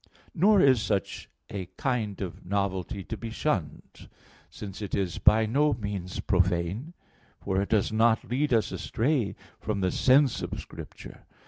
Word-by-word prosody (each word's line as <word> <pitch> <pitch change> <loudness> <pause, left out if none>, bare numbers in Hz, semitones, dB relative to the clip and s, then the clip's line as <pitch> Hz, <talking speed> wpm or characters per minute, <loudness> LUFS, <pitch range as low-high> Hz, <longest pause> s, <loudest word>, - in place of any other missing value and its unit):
Nor 200 +3 +5
is 130 -5 +5
such 100 -4 -2 0.2
a 95 -3 -4
kind 115 -7 -1
of 90 -5 -6
novelty 95 -1 -2
to 110 - -5
be 115 +2 -6
shunned; 110 - -3 0.4
since 100 0 -8
it 100 - -3
is 90 -5 -2
by 110 +1 +5
no 145 +6 +2
means 100 -5 -5
profane, 95 - 0 0.4
for 95 0 -1
it 100 - -3
does 110 -1 +2
not 110 +1 +3
lead 140 +4 0
us 115 -3 +2
astray 120 -3 0 0.2
from 105 -2 -2
the 95 -1 +1
sense 130 0 +4
of - - -4
Scripture. - - -11
105 Hz, 150 wpm, -28 LUFS, 95-125 Hz, 0.4 s, Nor